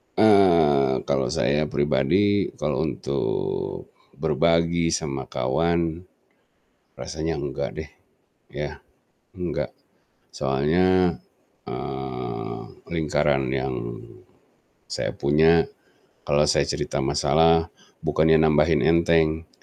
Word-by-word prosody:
Eee, 85 -11 +4
kalau 70 -1 0
saya 75 +2 0
pribadi, 85 +9 +1
kalau - - -1
untuk 70 - -3 0.2
berbagi 85 0 +1
sama 70 -5 -3
kawan 85 +6 -1 0.9
rasanya 80 +1 -4
enggak 70 -2 -4
deh. - - -7 0.6
Ya. 75 0 -6 0.5
Enggak. 90 -1 -4 0.6
Soalnya, 85 +7 +1 0.5
eee, 65 -2 -5 0.3
lingkaran 75 -4 0
yang 65 0 -2 1.1
saya - - -3
punya, 80 +4 +3 0.6
kalau 75 0 +3
saya 75 - +2
cerita - - -2
masalah, 80 +4 +2 0.3
bukannya 80 +1 +3
nambahin 80 0 +3
enteng, 80 -1 +2
80 Hz, 85 wpm, -24 LUFS, 70-85 Hz, 1.1 s, Eee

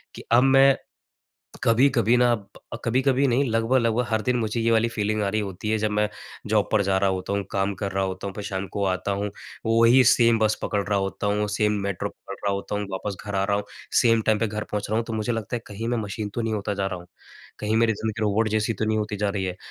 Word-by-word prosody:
कि - - -9
अब 120 +2 +6
मैं 135 0 +6 0.9
कभी-कभी 120 -1 +4
ना 120 0 +4
अ, 105 +1 -8
कभी-कभी 130 +3 +2
नहीं 130 +3 +2
लगभग-लगभग 115 +1 +1
हर 110 -1 +1
दिन 125 +2 0
मुझे 110 0 -1
ये 115 0 +2
वाली 115 +1 +3
फ़ीलिंग 110 -1 -1
आ 100 - 0
रही 110 +2 0
होती 100 +1 -5
है, 110 - +2
जब 110 0 -1
मैं 105 0 +1 0.4
जॉब 105 -1 +1
पर 105 - +3
जा 95 0 +1
रहा 95 0 +2
होता 95 +1 -2
हूँ, 100 0 -1
काम 100 -1 0
कर 100 - -2
रहा 95 0 0
होता 95 +1 -4
हूँ, 95 - -6
फिर 105 - -5
शाम 95 -2 -4
को 100 - 0
आता 95 +1 -1
हूँ, 100 +1 -2 0.4
वही 115 +3 +5
सेम 115 -2 +3
बस 110 0 +2
पकड़ 100 -1 -1
रहा 100 - +1
होता 95 +1 -2
हूँ, 105 +1 0
सेम 105 +1 +1
मेट्रो 100 -2 -2
पकड़ 100 - -10
रहा 100 - +2
होता 100 +1 -4
हूँ, 105 0 -2
वापस 95 +1 -4
घर 100 -1 -4
आ 95 - +1
रहा 100 0 +1
हूँ, 105 - -3 0.4
सेम 115 -2 +4
टाइम 110 -1 +2
पे 115 - +1
घर 105 0 -4
पहुँच 105 -1 -2
रहा 110 - +1
हूँ। 115 - -1
तो 115 - -5
मुझे 110 +2 -1
लगता 115 0 -3
है 120 - -4
कहीं 110 +3 -5
मैं 120 - 0
मशीन 105 0 -4
तो 120 - -1
नहीं 115 -1 -1
होता 105 -1 -2
जा 100 -1 -2
रहा 90 -2 -5
हूँ। 85 - -14 0.5
कहीं 105 +1 -1
मेरी 115 -1 +3
ज़िंदगी 110 +1 -4
रोबोट 110 +1 +2
जैसी 110 +1 0
तो 110 - -2
नहीं 110 0 +1
होती 105 0 -2
जा 105 0 0
रही 100 -1 -2
है, 90 -1 -3
105 Hz, 260 wpm, -24 LUFS, 100-115 Hz, 0.9 s, अब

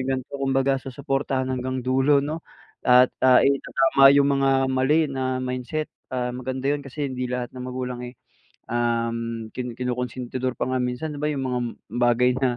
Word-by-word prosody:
yung 130 - -3
ganito. 130 +2 -8
Kumbaga, 135 0 +1
susuportahan 135 0 -2
hanggang 130 0 -3
dulo 135 +3 +3
'no 155 +3 -4 0.4
at, 125 0 +5
ah, 130 -1 +7
itatama 135 0 +4
yung 140 0 +5 0.2
mga 135 - +4 0.2
mali 135 +5 +2
na 130 -2 -2
mindset. 130 +4 -3 0.2
Ah, 125 -1 -2
maganda 130 +1 -4
yun 145 0 0
kasi 140 +1 -4
hindi 125 -1 -4
lahat 125 -1 -4
ng 125 - -6
magulang, 125 -1 -4
eh, 125 0 -9 0.5
um, 115 -1 -1
kin 125 -2 -5
kinukunsintidor 125 0 -3
pa - - -1
nga 130 0 -1
minsan, 125 +5 -3
di 145 - -7
ba, 150 - 0
yung 140 -3 -2
mga 125 -1 -1 0.3
bagay 120 +1 +3
na 125 -2 +1
130 Hz, 170 wpm, -24 LUFS, 125-135 Hz, 0.5 s, ah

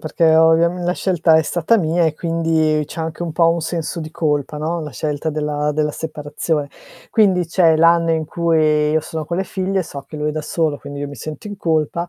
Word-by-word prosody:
perché 160 +1 +2
ovviam 165 +2 +4
la 175 - 0
scelta 175 -4 +2
è 160 - +4
stata 175 +8 +1
mia, 170 -1 +1
e 160 - +1
quindi 160 -2 +1
c'è 155 - -7
anche 160 +1 -4
un 170 - -3
po' 165 +1 +3
un 170 0 +1
senso 165 0 -3
di 155 -1 -6
colpa 150 -2 -1
no, 165 +3 -2
la 150 -2 -6
scelta 150 +1 -3
della 150 0 -1
della 150 0 0
separazione. 150 -1 -3 0.4
Quindi 190 -5 +3
c'è 165 -1 +3
l'anno 165 +1 +4
in 160 -1 0
cui 155 -2 +1
io 160 - +2
sono 160 0 -5
con 170 +3 -3
le 190 - -1
figlie, 190 +1 -2
so 140 -3 -8
che 155 - -8
lui 150 0 -1
è - - -6
da 155 0 -4
solo 155 -2 -1
quindi 145 0 -8
io 145 - -3
mi 145 - -9
sento 150 - -8
in 205 -1 -6
colpa, 165 0 -1
160 Hz, 225 wpm, -19 LUFS, 150-170 Hz, 0.4 s, ovviam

